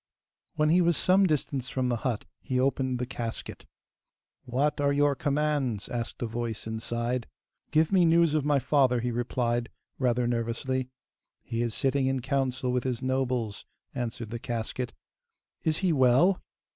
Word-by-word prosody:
When 155 -1 +2
he 175 +3 +5
was 170 -3 +3
some 190 +1 +4
distance 140 -4 -1
from 130 -1 -1
the 120 - +1
hut, 115 -2 -2 0.2
he 130 -1 -1
opened 130 -1 +1
the 125 - -2
casket. 120 -2 -6 0.8
'What 145 +4 0
are 140 0 +3
your 145 0 +3
commands?' 140 -6 0
asked 120 0 -4
a - - +1
voice 115 -1 -4
inside. 115 +2 -2 0.4
'Give 155 +2 +3
me 190 -2 +5
news 165 -1 +4
of 155 -2 +2
my 145 0 +3
father,' 130 -2 +3
he 125 +1 -1
replied, 120 0 -1 0.3
rather 125 -2 +2
nervously. 120 +2 -1 0.5
'He 115 0 -3
is 120 -2 -1
sitting 135 0 +1
in 135 0 +1
council 130 -1 0
with 125 0 0
his 130 -1 -2
nobles,' 130 -4 -1 0.3
answered 120 -3 -4
the 120 - -4
casket. 120 +1 -3 0.7
'Is 155 -1 +1
he 175 - +3
well? 135 +8 +4
130 Hz, 160 wpm, -28 LUFS, 120-145 Hz, 0.8 s, he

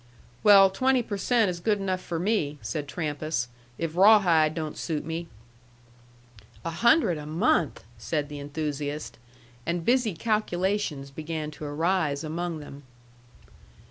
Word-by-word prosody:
"Well, 195 -2 +7
twenty 255 +4 +2
per 210 - -4
cent 225 -2 +2
is 175 - -6
good 210 +4 +1
enough 185 -2 -2
for 170 - -4
me," 165 -6 0
said 125 +7 -3
Trampas, 150 -4 -3 0.3
"if 165 -1 -3
Rawhide 175 -6 +5
don't 155 -2 -4
suit 155 -3 -3
me." 165 +1 -4 1.4
"A 165 - -1
hundred 230 - +3
a 150 - -8
month!" 165 - +1 0.2
said 145 +6 -2
the 145 0 -7
enthusiast. 145 -1 -4 0.4
And 170 +2 -2
busy 240 -6 +2
calculations 190 -7 -1
began 155 +1 -5
to 150 - -8
arise 155 0 0
among 165 0 -3
them. 145 -1 -10
165 Hz, 135 wpm, -27 LUFS, 150-195 Hz, 1.4 s, Well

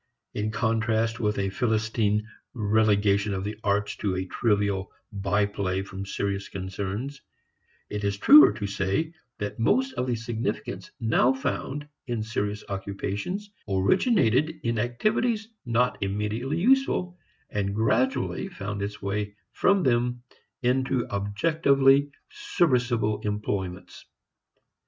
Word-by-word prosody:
In 105 +1 -1
contrast 110 0 0
with 105 -2 0
a 95 -1 0
Philistine 110 -1 0 0.3
relegation 105 -2 +2
of 95 - -3
the 105 +1 -5
arts 100 0 0
to 95 -3 -1
a 95 0 -2
trivial 100 -2 0 0.2
by 100 0 +1
play 95 -2 -2
from 95 0 -7
serious 100 0 -2
concerns, 100 +8 -5 0.7
it 105 0 -4
is 100 0 0
truer 295 - +9
to 100 - -4
say 100 - -1 0.2
that 100 +1 -5
most 130 +4 +2
of 125 0 -2
the 125 - +1
significance 115 0 -4
now 115 +2 +3
found 145 +2 -3 0.2
in 120 -3 -2
serious 105 -1 -3
occupations 100 - -4 0.2
originated 155 - +2
in 115 -1 0
activities 215 - 0 0.2
not 120 +2 +1
immediately 105 +8 -2
useful, 225 -5 +2 0.4
and 100 -1 -1
gradually 110 -4 +1
found 100 +1 -5
its 100 +1 -5
way 100 +1 -2 0.2
from 195 -2 +3
them 120 -1 +1 0.4
into 130 0 +1
objectively 140 +6 +3 0.2
serviceable 125 - +1
employments. 95 -3 -4
110 Hz, 120 wpm, -26 LUFS, 100-130 Hz, 0.7 s, truer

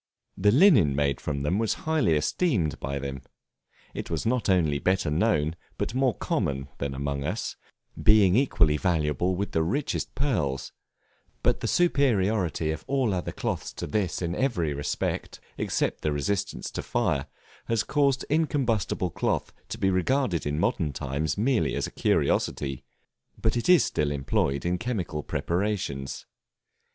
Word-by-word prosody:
The 105 +2 +3
linen 120 - +6
made 70 -2 0
from 70 -2 -3
it 75 - +1
was 110 -1 +1
highly 155 - +2
esteemed 85 - 0
by 70 0 -3
them; 70 -1 -5 0.7
it - - -5
was 80 -2 -2
not 120 -1 +1
only 80 -6 +3
better 95 -3 +1
known, 80 -3 +1 0.2
but - - -2
more 130 -2 +2
common, 70 0 -2
than 70 -1 -3
among 70 0 -2
us, 90 +10 -3 0.5
being 105 -3 +5
equally 85 - +3
valuable 85 0 +1
with 100 +3 -3
the 80 - +1
richest 130 - -2
pearls; 85 - -1 0.7
but - - +2
the - - -2
superiority 105 - +2
of 80 -1 -5
all 130 -6 +1
other 90 -1 -2
cloths - - -3
to - - -5
this 95 +3 -1
in 85 0 -1
every 90 - 0
respect, 70 +1 -3 0.2
except - - -1
the 75 - 0
resistance 100 +8 -2
to - - -4
fire, - - 0 0.4
has 115 -2 +1
caused 140 -3 +1
incombustible 130 - 0
cloth - - -1 0.2
to - - -4
be 95 -4 +2
regarded 95 - +1
in 75 +1 -1
modern 75 -2 0
times 70 +4 -2
merely 120 +3 +1
as - - -1
a - - -7
curiosity, 70 -2 0 0.6
but 110 - +1
it 120 +7 -1
is 180 -2 +7
still 75 -1 0
employed 70 0 0
in 90 +1 0
chemical 105 -11 -3
preparations. 85 -7 -2
90 Hz, 150 wpm, -27 LUFS, 75-115 Hz, 0.7 s, is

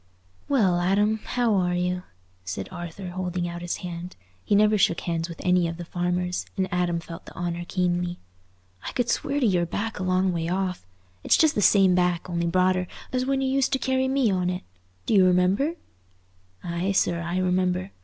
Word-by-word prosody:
"Well, 200 -11 +3
Adam, 205 +4 +2
how 240 -3 +1
are 180 -2 +1
you?" 180 0 -1 0.4
said 95 +1 -5
Arthur, 175 +1 -7
holding 180 -1 -3
out 175 0 -6
his 175 0 -3
hand. 175 +1 -6 0.3
He 205 - +2
never 210 +1 +5
shook 180 -4 +2
hands 165 0 -2
with 165 - -9
any 180 -2 +3
of 165 0 -5
the 175 - -6
farmers, 180 +1 -2
and 190 -1 +1
Adam 175 -1 +1
felt 165 0 -10
the - - -12
honour 175 0 -3
keenly. 175 -1 -1 0.7
"I - - -5
could 245 -2 0
swear 285 +1 -1
to 265 - +2
your 180 -5 +2
back 225 +5 -3
a - - -2
long 185 0 +2
way 165 -1 -2
off. 180 - -2 0.4
It's - - +4
just 315 -2 +4
the 210 - 0
same 195 -2 +5
back, 180 -1 +1
only 170 -1 -1
broader, 185 +1 +2 0.3
as 255 0 0
when 270 0 +1
you 265 - 0
used 270 +1 +1
to - - +3
carry 260 +1 0
me 265 -4 +2
on 180 -1 0
it. 180 0 -3 0.4
Do - - 0
you 195 -3 +6
remember?" 185 - +3 0.9
"Aye, 175 +3 -1
sir, 170 -3 +1
I 170 +2 -2
remember. 185 +1 0
180 Hz, 195 wpm, -25 LUFS, 175-200 Hz, 0.9 s, you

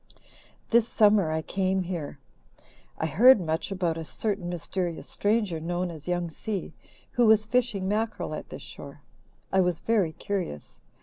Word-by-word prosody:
"This 235 -1 +5
summer 205 -7 +4
I 160 0 -1
came 190 +1 0
here. 170 -5 -5 0.8
I - - -1
heard 220 - +7
much 160 +1 -2
about 175 -4 -1
a - - -4
certain 195 +1 -3
mysterious 175 0 -3
stranger 205 -5 0
known 175 +2 -2
as 155 -1 -10
'Young 175 -1 -1
Si' 195 +1 -4 0.4
who 240 -2 +3
was 215 -1 +5
fishing 220 -5 0
mackerel 220 +3 -1
at - - -6
this - - -8
shore. - - -10 0.5
I 190 - +5
was 180 -2 0
very 200 -8 +1
curious. 180 - -5
185 Hz, 150 wpm, -27 LUFS, 165-215 Hz, 0.8 s, heard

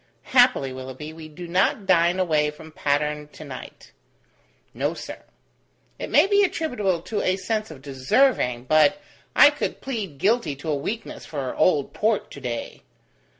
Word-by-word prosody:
Happily, 245 - +4
Willoughby, 130 +4 -8
we 160 -1 -10
do 175 +3 -9
not 190 +3 +1
dine 175 0 +3
away 155 -5 +2
from 155 +1 -12
Patterne 150 0 -1
to - - -10
night." 130 -3 -10 0.8
"No, - - -1
sir." - - -8 0.8
"It - - -5
may 295 +5 +6
be 405 +1 +4
attributable 215 - -1
to 210 +2 -2
a 185 +1 +1
sense 215 +3 -2
of 140 -4 -12
deserving, 135 - +1
but 155 +8 +4 0.4
I 290 - +8
could 295 - -4
plead 215 - -5
guilty 200 - +1
to 155 +3 -4
a - - +1
weakness 210 +11 -5
for 140 -4 -4
old 150 -6 +2
Port 215 0 0
to 140 - -10
day." 120 -2 -5
165 Hz, 155 wpm, -24 LUFS, 145-215 Hz, 0.8 s, I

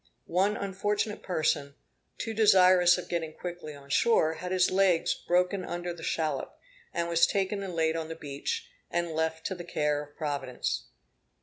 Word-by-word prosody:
One 195 +4 +1
unfortunate 205 +2 -2
person, 150 -5 0 0.4
too 225 - -3
desirous 185 -4 +6
of 180 - -6
getting 165 -2 -2
quickly 175 -4 -7
on 140 0 -13
shore, 160 -4 +3
had 180 +2 -6
his 185 -1 +3
legs 185 -3 +3
broken 180 +2 0
under 175 0 -4
the 170 - -11
shallop, 160 -1 -2 0.3
and 170 0 -1
was 170 0 +4
taken 200 0 -1
and 190 -3 -5
laid 160 0 +1
on 165 -1 -3
the 165 - -6
beach, 160 - -4 0.2
and 170 -1 -1
left 160 0 -2
to - - -1
the 175 -2 -7
care 150 -3 0
of 145 0 -13
Providence. 145 -5 -2
175 Hz, 170 wpm, -29 LUFS, 160-185 Hz, 0.4 s, desirous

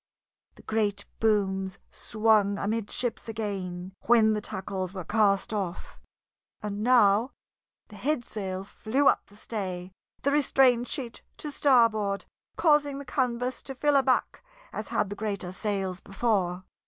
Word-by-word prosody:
The - - -17
great 205 -2 -1
booms 195 -3 +1
swung 215 -2 +2
amidships 225 +3 -2
again 190 -4 -4
when 220 -2 +5
the 210 - -1
tackles 190 -1 -4
were 185 - -4
cast 205 +2 +2
off, 190 -5 -4 0.6
and 205 -1 -4
now 230 0 +4 0.6
the 210 - -12
headsail 210 -9 -2
flew 255 +7 0
up - - +3
the 205 - -19
stay, 190 -4 -5 0.3
the 280 - +2
restrained 260 -4 +4
sheet 250 -6 -4 0.2
to 300 - -5
starboard 230 -8 +3 0.3
causing 295 -3 +3
the 280 - -7
canvas 250 -1 -1
to 270 - -7
fill 290 +2 +2
aback 265 - +2 0.3
as - - -4
had 200 - -1
the - - -3
greater 200 -4 -3
sails 190 -2 -2
before. 195 -4 -1
215 Hz, 130 wpm, -28 LUFS, 195-245 Hz, 0.6 s, when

